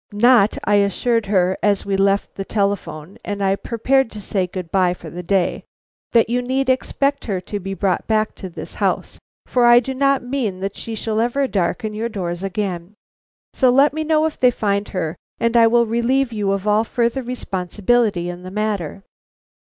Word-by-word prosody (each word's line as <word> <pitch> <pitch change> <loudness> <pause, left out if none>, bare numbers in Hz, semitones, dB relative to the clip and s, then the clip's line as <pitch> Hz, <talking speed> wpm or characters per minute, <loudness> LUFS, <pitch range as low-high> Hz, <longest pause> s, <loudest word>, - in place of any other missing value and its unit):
"Not," 225 -1 +4
I 205 0 +3
assured 210 +3 +1
her, 185 -2 +1
as 205 -2 +1
we 200 -1 0
left 195 +1 +1
the 195 - -5
telephone 200 -2 -3
and 205 -1 -3
I 195 0 +2
prepared 250 +4 +1
to 210 - -7
say 190 -2 -1
good 180 -2 -7
bye 180 -2 +2
for 165 -3 -11
the 175 - -6
day, 180 +1 0 0.5
"that 230 -1 +4
you 245 +2 0
need 260 +2 -1
expect 275 +2 0
her 195 -5 -2
to 205 +3 -5
be 195 0 -5
brought 195 -1 -1
back 215 -1 +1
to 190 - -7
this 170 - -8
house, - - -2 0.3
for 245 -1 +3
I 240 0 +8
do 265 +2 -4
not 275 0 +2
mean 245 -7 -2
that 195 +1 -3
she 225 - -6
shall 220 0 -1
ever 265 +4 +1
darken 210 +2 -1
your 225 +2 -3
doors 175 -5 -4
again. 195 -1 -4 0.6
So 260 - +3
let 275 +4 +4
me 315 +1 -2
know 310 0 +2
if 320 - -3
they 250 - +6
find 205 -3 -1
her, 165 -5 -3 0.2
and 230 0 0
I 230 -1 +7
will 235 +1 +4
relieve 235 +3 0
you 205 -2 -1
of 195 +1 -2
all 210 +1 +3
further 235 +2 -1
responsibility 210 -3 -1
in 175 0 -6
the 185 - -8
matter." 200 -3 -3
210 Hz, 195 wpm, -20 LUFS, 195-240 Hz, 0.6 s, I